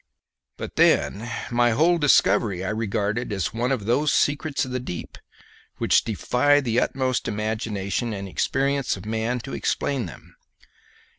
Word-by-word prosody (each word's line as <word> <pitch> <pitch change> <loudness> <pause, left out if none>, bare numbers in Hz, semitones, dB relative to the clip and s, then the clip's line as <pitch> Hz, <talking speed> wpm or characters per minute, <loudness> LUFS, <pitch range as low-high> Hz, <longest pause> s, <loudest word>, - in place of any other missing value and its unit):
But - - -7
then 110 +4 +3 0.2
my 120 -1 +3
whole 170 +3 +4
discovery 105 - +3
I - - -1
regarded 110 +1 -2
as 95 -4 -2
one 120 +3 -1
of 120 -7 -1
those 140 +6 +2
secrets 145 -1 +1
of 130 - -8
the 130 - -1
deep 105 -9 -7 0.6
which - - +3
defy 125 +6 +2
the 120 -4 +1
utmost 130 -2 -1
imagination 110 +1 -2
and 100 -2 -5
experience 135 +5 0
of 95 - -10
man 115 +3 -2
to 135 - -8
explain 135 -8 -1
them. 75 - -13
120 Hz, 145 wpm, -24 LUFS, 105-135 Hz, 0.6 s, whole